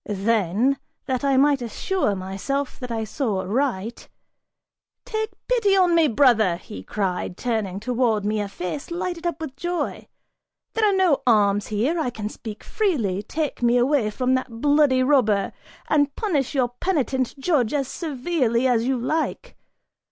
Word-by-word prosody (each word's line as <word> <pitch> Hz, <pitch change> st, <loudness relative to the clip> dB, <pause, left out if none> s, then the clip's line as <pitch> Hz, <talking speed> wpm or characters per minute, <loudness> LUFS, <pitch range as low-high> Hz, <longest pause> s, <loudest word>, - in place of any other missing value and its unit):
Then, 215 Hz, +4 st, +1 dB, 0.3 s
that 260 Hz, -1 st, -2 dB
I 275 Hz, -1 st, +3 dB
might 280 Hz, 0 st, +4 dB
assure 240 Hz, -, -1 dB
myself 195 Hz, +9 st, -3 dB
that 250 Hz, -, -6 dB
I 225 Hz, -1 st, -1 dB
saw 215 Hz, -3 st, -2 dB
aright, 230 Hz, 0 st, -2 dB, 1.0 s
"Take 435 Hz, 0 st, -2 dB, 0.2 s
pity 445 Hz, -6 st, +3 dB
on 360 Hz, -2 st, +4 dB
me, 330 Hz, -2 st, +5 dB
brother," 225 Hz, -8 st, +4 dB
he 95 Hz, -, -9 dB
cried, 180 Hz, -, -3 dB
turning 215 Hz, -6 st, -2 dB
towards 230 Hz, -2 st, 0 dB
me 210 Hz, 0 st, 0 dB
a 205 Hz, -, -3 dB
face 195 Hz, +8 st, -5 dB
lighted 345 Hz, 0 st, -3 dB
up 335 Hz, -3 st, -3 dB
with 310 Hz, -5 st, -6 dB
joy, 350 Hz, 0 st, -3 dB, 0.7 s
"there 440 Hz, -2 st, +3 dB
are 385 Hz, -, +1 dB
no 360 Hz, -7 st, +3 dB
arms 205 Hz, -3 st, +3 dB
here, 245 Hz, +11 st, 0 dB
I 305 Hz, -, 0 dB
can 215 Hz, -3 st, -5 dB
speak 215 Hz, -1 st, -9 dB
freely 240 Hz, -, 0 dB
take 295 Hz, +7 st, -3 dB
me 240 Hz, 0 st, +4 dB
away 250 Hz, -2 st, +2 dB
from 255 Hz, +4 st, 0 dB
that 260 Hz, 0 st, 0 dB
bloody 285 Hz, -2 st, +4 dB
robber, 240 Hz, -8 st, +2 dB, 0.3 s
and 290 Hz, -2 st, +2 dB
punish 305 Hz, -, -1 dB
your 255 Hz, -3 st, +2 dB
penitent 275 Hz, -8 st, 0 dB
judge 270 Hz, -5 st, +1 dB
as 280 Hz, -3 st, 0 dB
severely 265 Hz, -5 st, -1 dB
as 240 Hz, -3 st, +2 dB
you 260 Hz, 0 st, +1 dB
like. 315 Hz, -, -2 dB
255 Hz, 155 wpm, -23 LUFS, 215-300 Hz, 1.0 s, me